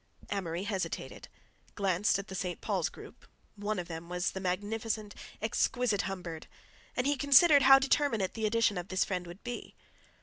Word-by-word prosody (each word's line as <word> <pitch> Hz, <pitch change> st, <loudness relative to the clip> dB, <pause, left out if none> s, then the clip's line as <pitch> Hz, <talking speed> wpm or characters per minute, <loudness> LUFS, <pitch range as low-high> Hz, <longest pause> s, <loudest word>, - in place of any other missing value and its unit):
Amory 180 Hz, -3 st, -2 dB
hesitated, 200 Hz, -2 st, -4 dB, 0.5 s
glanced 195 Hz, 0 st, +2 dB
at 200 Hz, 0 st, -6 dB
the -, -, -8 dB
St. 180 Hz, -1 st, -3 dB
Paul's -, -, -1 dB
group—one 210 Hz, 0 st, -8 dB
of 175 Hz, -1 st, -4 dB
them 165 Hz, 0 st, -7 dB
was 180 Hz, 0 st, -1 dB
the 190 Hz, -, -5 dB
magnificent, 205 Hz, +3 st, -2 dB, 0.3 s
exquisite 220 Hz, -1 st, +1 dB
Humbird—and 185 Hz, +6 st, -7 dB
he 290 Hz, +1 st, +2 dB
considered 285 Hz, +2 st, +6 dB
how 270 Hz, 0 st, +9 dB
determinate 270 Hz, -7 st, +1 dB
the 220 Hz, -1 st, -1 dB
addition 210 Hz, -3 st, +2 dB
of 175 Hz, -, -7 dB
this 185 Hz, -1 st, +1 dB
friend 180 Hz, -2 st, -3 dB
would 175 Hz, +3 st, -11 dB
be. 245 Hz, -1 st, -6 dB
205 Hz, 155 wpm, -31 LUFS, 180-230 Hz, 0.5 s, how